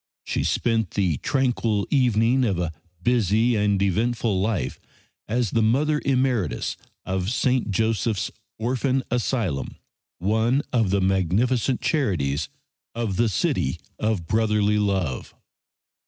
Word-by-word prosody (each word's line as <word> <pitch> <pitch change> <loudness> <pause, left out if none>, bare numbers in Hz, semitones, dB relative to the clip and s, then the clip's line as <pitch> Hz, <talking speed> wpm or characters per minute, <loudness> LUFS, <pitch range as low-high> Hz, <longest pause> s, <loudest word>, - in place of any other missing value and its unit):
She - - -2
spent 115 -5 +1
the 90 -7 +1
tranquil 120 - 0
evening 125 -1 +3
of 100 -7 +1
a 85 -2 -1 0.3
busy 115 0 +2
and 105 -2 +2
eventful 105 +1 +1
life 95 - -1 0.5
as 115 -1 0
the 115 - +2
Mother 150 +7 +2
Emeritus 125 - 0 0.3
of 95 0 -1
St. 125 -1 +1
Joseph's 110 0 0 0.3
Orphan 130 +3 0
Asylum, 115 - -1 0.4
one 110 +8 +1
of 115 -5 +2
the 100 +1 +2
magnificent 100 - +1
charities 80 - 0 0.5
of 115 -5 -2
the 115 0 +3
City 95 - 0 0.2
of 110 -6 0
Brotherly 105 0 +2
Love. 95 -10 -1
110 Hz, 115 wpm, -24 LUFS, 95-120 Hz, 0.5 s, evening